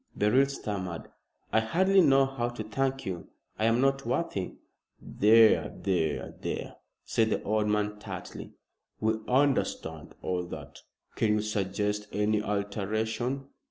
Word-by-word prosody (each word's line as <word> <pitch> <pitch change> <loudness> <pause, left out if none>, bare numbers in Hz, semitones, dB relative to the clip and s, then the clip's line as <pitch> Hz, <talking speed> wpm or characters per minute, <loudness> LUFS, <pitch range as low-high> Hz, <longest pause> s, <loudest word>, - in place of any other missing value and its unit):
Beryl 125 +7 +4
stammered. 100 -10 -5 0.4
"I 110 - +6
hardly 190 +12 +3
know 135 -4 +5
how 130 -3 -2
to 120 -2 -6
thank 135 +4 -1
you. 90 -3 -5 0.3
I 110 - +2
am 115 +1 +3
not 135 +1 +2
worthy 120 - -2 0.3
" - - -50
"There 110 +1 +5
there 85 -6 -1
there!" - - -4 0.3
said 110 -1 +2
the - - -1
old 105 0 +1
man 105 0 0
tartly. - - -8 0.5
"We 110 0 +2
understand 125 - 0
all 90 -1 -2
that. - - -9 0.3
Can 105 -2 +2
you 105 - +1
suggest 105 0 -1
any 105 +1 +1
alteration?" 110 +6 -2
110 Hz, 135 wpm, -29 LUFS, 105-130 Hz, 0.5 s, I